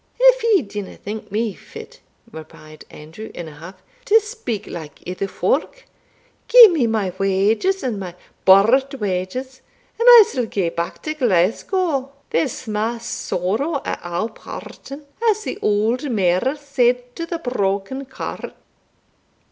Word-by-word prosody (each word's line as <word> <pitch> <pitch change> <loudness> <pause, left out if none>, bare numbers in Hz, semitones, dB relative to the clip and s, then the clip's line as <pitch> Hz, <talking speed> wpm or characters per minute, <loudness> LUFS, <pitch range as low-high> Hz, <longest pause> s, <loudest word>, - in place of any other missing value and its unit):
"If - - +6
ye 445 -5 +3
dinna 205 -1 -7
think 210 0 -7
me 215 0 -1
fit," - - -12 0.3
replied 155 -1 -12
Andrew, 160 +9 -10
in 170 - -6
a 155 - -10
huff, 175 +5 -12 0.2
"to 445 -1 +6
speak 425 - -5
like 155 -4 -8
ither 185 +2 -3
folk, - - -1 0.6
gie 475 -2 +10
me 305 -10 +1
my 210 -5 -1
wages 205 - +1
and 235 -6 -2
my 180 -3 -7 0.3
board 230 +9 +5
wages, 210 +5 -4 0.4
and 470 - +1
I'se 410 - +7
gae 185 -4 0
back 170 0 -5
to 310 - -2
Glasgow 270 - 0 0.2
There's 275 - +1
sma' 220 +2 -3
sorrow 230 - -2
at - - -3
our 175 +5 -3
parting, 275 +5 -10 0.2
as 430 0 0
the - - -5
auld 225 +7 +1
mear 200 +4 +1
said 250 -3 0
to 335 - -4
the 340 - -3
broken 245 -2 -2
cart." 265 - -7
230 Hz, 140 wpm, -20 LUFS, 190-280 Hz, 0.6 s, gie